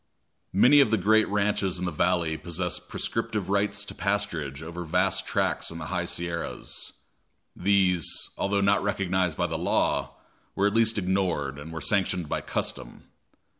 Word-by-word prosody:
Many 135 +9 +7
of 140 - +5
the 110 - +3
great 110 +3 +3
ranches 100 -2 0
in 90 - -3
the 90 - -1
valley 85 0 +1
possessed 85 0 -3
prescriptive 110 -4 -2
rights 100 0 0
to - - -8
pasturage 85 -8 -2
over 85 +2 -6
vast 80 - +1
tracts - - 0
in 85 - -6
the 80 - -6
high 90 -1 0
Sierras. 85 -1 -4 0.6
These, 95 -3 +2 0.3
although 100 0 0
not 100 0 +3
recognized 95 -4 0
by - - +1
the - - -3
law, - - 0 0.4
were 100 - +2
at 100 - +2
least 115 0 +3
ignored, 90 -8 0
and 75 +3 -8
were 80 -1 -6
sanctioned 90 +1 +1
by - - -2
custom. - - -4
95 Hz, 160 wpm, -27 LUFS, 85-100 Hz, 0.6 s, Many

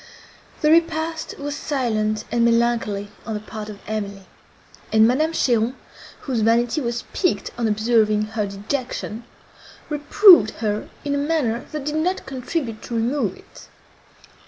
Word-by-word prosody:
The 300 - +4
repast 325 -1 +1
was 290 0 -4
silent 220 -8 -1
and 235 0 +2
melancholy 230 -3 +1
on 220 - -4
the - - -2
part 215 0 -8
of 210 - -8
Emily; 200 -2 -4 0.7
and 220 0 +6
Madame 305 +7 +2
Cheron, 240 -5 +1 0.5
whose 250 -5 -1
vanity 235 +6 +2
was 235 -2 -2
piqued 280 - 0
on 235 -2 0
observing 215 -1 +2
her 210 -2 -1
dejection, 220 +2 -4 0.6
reproved 300 - +6
her 210 -2 -2 0.2
in 285 - 0
a 285 - 0
manner 285 -6 -1
that 300 -3 -5
did 300 +1 -1
not 360 +4 -1
contribute 255 -3 -4
to 235 - -6
remove 240 +6 0
it. - - -16
235 Hz, 140 wpm, -22 LUFS, 215-290 Hz, 0.7 s, and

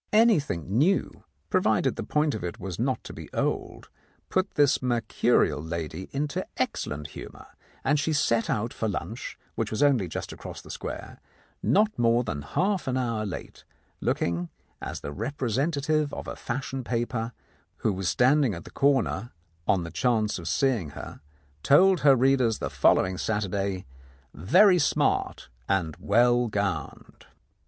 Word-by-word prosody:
Anything 140 - +3
new, 185 +6 +1 0.3
provided - - +2
the - - -4
point 150 0 +1
of 110 - -5
it 90 +6 -5
was 95 -2 -6
not 130 +2 0
to - - -8
be - - -10
old, - - -2 0.4
put 185 +1 0
this 145 -2 +4
mercurial 115 - +1
lady 80 +2 -5
into 145 +1 -2
excellent 75 0 -2
humour, - - -10 0.4
and 150 - +2
she 160 - 0
set 115 -6 +1
out 115 +2 -1
for 110 - -2
lunch, 100 - -5 0.2
which - - -2
was 110 - 0
only 130 -10 +3
just 80 - -5
across - - -8
the - - -10
square, - - -7 0.4
not 210 - +2
more 120 +1 +3
than 70 -10 -4
half 190 - -1
an 130 0 0
hour 115 -4 -1
late, 90 - -8 0.4
looking, 85 0 -1 0.3
as - - -5
the 70 - -5
representative 145 - -1
of - - -7
a - - -5
fashion 130 +1 -4
paper 120 -1 -2 0.5
who 110 - +3
was 95 -1 -1
standing 130 - +3
at 85 - -8
the - - -12
corner 135 -4 +1 0.4
on 95 -3 +3
the 85 - -7
chance 110 -6 +1
of 85 - -7
seeing 125 - +1
her - - -8 0.4
told 185 - +5
her 140 -2 +6
readers 130 -3 +3
the - - -4
following 95 0 +3
Saturday, 100 -3 -1 0.5
"very 180 - +5
smart 145 - 0 0.2
and 85 -6 0
well 120 0 +3
gowned." 100 -6 -4
120 Hz, 150 wpm, -27 LUFS, 95-140 Hz, 0.5 s, her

